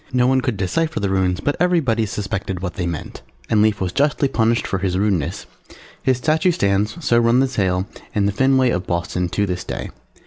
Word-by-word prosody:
No 125 -1 +2
one 130 +1 +3
could 125 -6 -2
decipher 155 - -1
the 100 -2 -1
Runes, 95 -1 +1
but 145 - 0
everybody 145 -11 +2
suspected 100 -2 -4
what 90 -1 -4
they 90 -2 -3
meant. 85 -3 -6 0.3
And 110 -2 +4
Lief 105 -1 +2
was 95 -2 -1
justly 145 +4 +1
punished 115 -2 +1
for 95 - -2
his 90 -1 -1
rudeness, 95 -4 -1 0.6
his 130 -2 +2
statue 155 +7 +2
stands 105 - 0
(so 120 -3 +4
runs 120 +1 +3
the - - -8
tale) 95 -2 +1 0.3
in 100 -1 +2
the 100 - +2
Fenway 130 +2 +3
of 90 -2 -2
Boston 90 +1 -1
to 100 +3 0
this 90 -2 -3
day. - - -5
105 Hz, 205 wpm, -20 LUFS, 95-130 Hz, 0.6 s, And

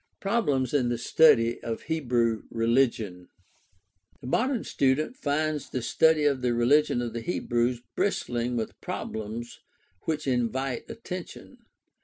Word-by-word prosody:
Problems 150 - 0
in 130 -4 +2
the 120 - -1
study 120 -2 +4
of 115 -1 -4
Hebrew 120 -8 0
religion. 115 -6 0 0.5
— 90 0 -40
The - - -10
modern 245 - 0
student 140 - +1
finds 155 - -1
the 130 - -3
study 160 +4 +3
of 140 -3 +2
the 125 -1 +1
religion 120 +1 +3
of 115 -2 -4
the 115 - -4
Hebrews 120 -5 -1
bristling 120 -10 -1
with 115 -2 -4
problems 110 +2 -5 0.5
which 155 -1 -2
invite 130 0 -1
attention. 195 -6 -8
125 Hz, 130 wpm, -27 LUFS, 115-150 Hz, 0.5 s, study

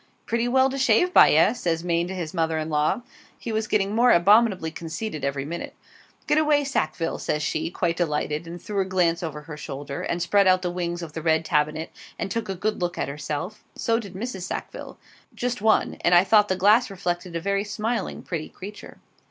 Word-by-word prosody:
'Pretty 235 +1 0
well 260 +2 +4
to 270 +1 -4
shave 265 +9 +3
by, - - +8
eh?' 160 +8 +5
says 170 -8 -2
Maine 170 0 0
to 190 - -5
his 170 -3 -5
mother 165 -2 0
in 155 0 -3
law. 150 +10 +1 0.3
(He 230 - -6
was 220 0 -1
getting 205 -1 +1
more 240 +2 +5
abominably 195 -2 +4
conceited 165 0 -5
every 140 0 -2
minute.) 170 +3 -6 0.5
'Get 300 - +3
away, 300 -2 +3
Sackville,' 225 -11 -2
says 150 0 -1
she, 155 +1 -1
quite 170 -1 -1
delighted, 150 -1 -1
and 170 +1 -7
threw 200 +1 -2
a - - 0
glance 175 -3 +1
over 155 -3 -5
her 150 0 -9
shoulder, 140 -1 -6
and 170 - -2
spread 200 +3 +3
out 185 0 +4
the 180 - -1
wings 175 -1 -3
of 155 -3 -8
the 160 - -5
red 160 0 +2
tabinet, 155 +2 0 0.3
and 195 - -4
took 230 -1 -3
a 195 - -2
good 210 +2 -2
look 175 -1 -2
at - - -2
herself; 150 +7 -5
so 230 0 +1
did 200 -5 -9
Mrs. 205 -1 -5
Sackville - - -6 0.4
just 245 -2 -2
one, 220 0 +2
and 175 - +5
I 175 - +7
thought 210 +1 +4
the 185 - 0
glass 210 +6 +4
reflected 175 -2 -4
a - - 0
very 200 +3 0
smiling, 225 +3 -3
pretty 160 -4 -4
creature. 205 +2 -10
180 Hz, 210 wpm, -24 LUFS, 165-215 Hz, 0.5 s, by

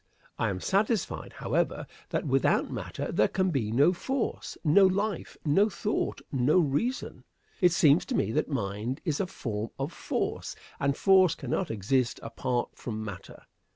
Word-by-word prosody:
I 115 - +1
am 95 -2 -3
satisfied, 210 - 0
however, - - -1 0.2
that - - -1
without - - +2
matter - - -4
there - - +3
can 185 -1 0
be 115 -8 -1
no 140 +10 +4
force, 265 +7 -3
no 185 +5 +6
life, 200 +1 -2
no 195 +9 +4
thought, 210 +3 -2
no 135 +5 +3
reason. 180 - 0 0.4
It 180 -1 +6
seems 160 -3 +5
to - - -2
me 105 - +1
that - - 0
mind 115 -1 -2
is 155 -3 0
a 195 - 0
form 115 - -4
of 135 +5 -3
force, - - -3 0.2
and 140 0 +1
force 190 -4 +5
cannot 160 +5 -2
exist 115 +4 0
apart 125 -2 -2
from 110 -2 -5
matter. 100 -4 -9
145 Hz, 155 wpm, -28 LUFS, 120-190 Hz, 0.4 s, no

